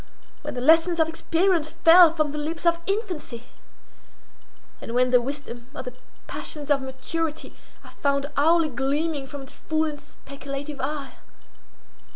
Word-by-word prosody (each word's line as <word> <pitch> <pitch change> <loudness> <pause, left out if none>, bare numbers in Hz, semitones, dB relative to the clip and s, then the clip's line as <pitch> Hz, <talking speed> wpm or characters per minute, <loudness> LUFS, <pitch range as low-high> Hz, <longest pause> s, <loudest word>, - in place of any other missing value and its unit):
—when - - -6
the 245 - -3
lessons 330 +4 +4
of 320 - +4
experience 330 0 +1
fell 335 +2 +7
from 310 -2 -1
the 300 - -5
lips 325 +3 -4
of 340 0 +3
infancy? 365 - -3 1.4
and 230 - -6
when 250 0 +3
the 250 -1 +5
wisdom 245 -2 -5
or - - -5
the 250 -1 -7 0.3
passions 295 -1 -5
of 275 -2 +3
maturity 300 +4 -4 0.3
I - - -13
found 280 -1 0
hourly 325 +2 +4
gleaming 280 +3 -1
from 280 0 -8
its 265 - -13
full 315 0 0
and 300 -2 -4
speculative 280 0 -8
eye? 280 0 -4
295 Hz, 150 wpm, -25 LUFS, 275-325 Hz, 1.4 s, fell